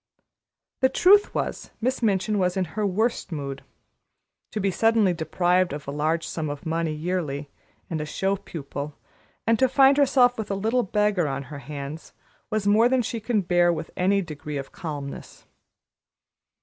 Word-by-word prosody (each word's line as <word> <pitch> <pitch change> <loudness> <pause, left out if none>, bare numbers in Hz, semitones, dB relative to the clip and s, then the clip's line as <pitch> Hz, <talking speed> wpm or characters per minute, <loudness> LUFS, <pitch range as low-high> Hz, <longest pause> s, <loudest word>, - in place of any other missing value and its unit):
The 260 - +4
truth 400 +9 +5
was, - - -3
Miss 255 +3 -1
Minchin 210 -1 +1
was 180 0 +1
in 185 - +1
her 210 -1 0
worst 215 +1 -1
mood. 140 -3 -5 0.9
To 215 - -4
be 195 -1 +1
suddenly 220 -1 +3
deprived 175 +1 +1
of 145 -1 -7
a - - -2
large 155 +3 0
sum 155 -2 -3
of 145 -1 -6
money 165 0 -1
yearly 155 -3 -3 0.4
and 160 -2 -3
a - - -3
show 195 +5 0
pupil, 145 -4 -7 0.5
and 225 0 +3
to 260 -1 +4
find 270 +1 +5
herself 250 -4 +4
with 215 - -4
a 200 - 0
little 225 +5 +1
beggar 210 -5 +1
on 135 0 -3
her 145 - -6
hands, 145 +3 -7 0.4
was 215 -2 -1
more 215 +4 +5
than 260 -1 +2
she 230 +1 -3
could 215 -4 -1
bear 175 -1 +4
with 165 -1 -4
any 195 +2 +2
degree 150 -2 -6
of 135 -1 -6
calmness. 145 -4 -7
185 Hz, 170 wpm, -25 LUFS, 155-220 Hz, 0.9 s, truth